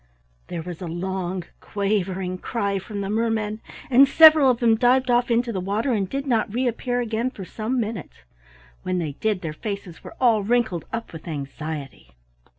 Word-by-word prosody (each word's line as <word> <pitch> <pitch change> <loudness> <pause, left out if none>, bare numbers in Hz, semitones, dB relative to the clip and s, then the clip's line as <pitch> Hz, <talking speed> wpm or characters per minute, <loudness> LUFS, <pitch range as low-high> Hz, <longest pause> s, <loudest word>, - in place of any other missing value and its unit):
There 165 - -5
was 175 0 -8
a 180 - -4
long, 180 +1 -3 0.2
quavering 195 -2 -2
cry 200 -3 -1
from 200 +2 -6
the 195 - -3
mermen, 220 -1 -1 0.3
and 270 +2 +6
several 310 -1 +8
of 245 -2 +2
them 230 -2 +4
dived 250 +2 +3
off 240 0 +2
into 235 0 +1
the 190 - -2
water 210 +8 0
and 195 -4 -1
did 275 +1 -3
not 230 -5 +1
reappear 245 +1 -1
again 230 +1 -1
for 200 -7 -9
some 230 +7 -2
minutes; 210 - -5 0.6
when 185 0 -2
they 160 -4 -2
did, 205 +6 -1
their 160 -4 -4
faces 200 -1 -6
were - - -10
all 230 -4 +4
wrinkled 220 -5 0
up 230 -4 -5
with 160 0 -10
anxiety. 145 - -6
215 Hz, 175 wpm, -23 LUFS, 185-240 Hz, 0.6 s, several